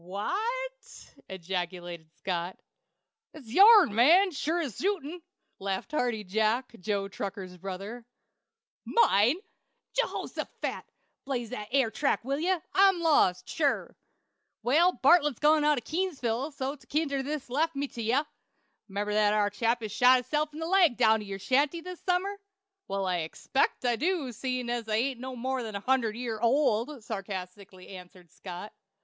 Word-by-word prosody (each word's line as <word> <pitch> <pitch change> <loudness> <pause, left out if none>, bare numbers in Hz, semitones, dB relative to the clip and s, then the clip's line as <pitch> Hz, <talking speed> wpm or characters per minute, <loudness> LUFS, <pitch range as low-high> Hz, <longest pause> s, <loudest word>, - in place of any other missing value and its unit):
"Wha 200 - -3 0.5
t!" - - -16
ejaculated 175 -2 -5
Scott. 180 -1 -3 0.8
"It's 270 -8 -12
your'n, 405 - +8
man, 340 - +5
sure 315 +3 -1
as 280 - -4
shootin'!" 355 -4 -2 0.4
laughed 195 +7 -3
Hearty 245 -7 -1
Jack, 220 +6 0
Joe 200 +1 -2
Tucker's 195 -2 -6
brother. 195 +6 -7 0.8
"Mine? 240 - +4 0.6
Jehoshaphat! - - -3 0.4
Blaze 245 -4 -3
that 210 -4 -5
air 260 -4 +2
track, 275 -3 0
will 275 +2 -1
ye? 350 +4 +1 0.2
I'm 385 -2 +5
lost, 285 - +3
sure." 290 -3 -1 0.7
"Well, 315 +10 +4
Bartlett's 285 +1 +4
gone 300 0 +4
out 300 -1 +3
Keeseville 280 -9 -1
way, - - -11
so't 270 +2 -5
kinder 280 -2 0
was 285 0 -4
lef' 305 +6 0
to - - -10
me 285 +1 -1
to - - -25
tell 230 - -5
ye. 250 +6 +2 0.6
'Member 205 +1 -3
that 210 0 +3
ar 205 -1 +2
chap 230 +3 0
that 215 -2 -5
shot 250 +4 +6
hisself 300 +5 -1
in 300 - -11
the 325 - -3
leg 350 -7 +4
down 220 -2 +4
to 210 - -8
your 195 0 -5
shanty 280 - +1
this 365 +1 -9
summer?" 385 +2 -1 0.5
"Well, 195 0 -2
I 180 -1 0
expect 170 +11 -1
I 240 -1 +2
do, 320 -4 -1
seein' 255 +1 -3
I 240 0 -1
ain't 240 +3 0
more'n 255 -3 -4
a - - -2
hundred 235 -1 +1
year 230 -2 -4
old," 240 +1 +1
sarcastically 190 -2 -7
answered 180 -2 -12
Scott. 180 +2 -9
245 Hz, 155 wpm, -28 LUFS, 205-300 Hz, 0.8 s, your'n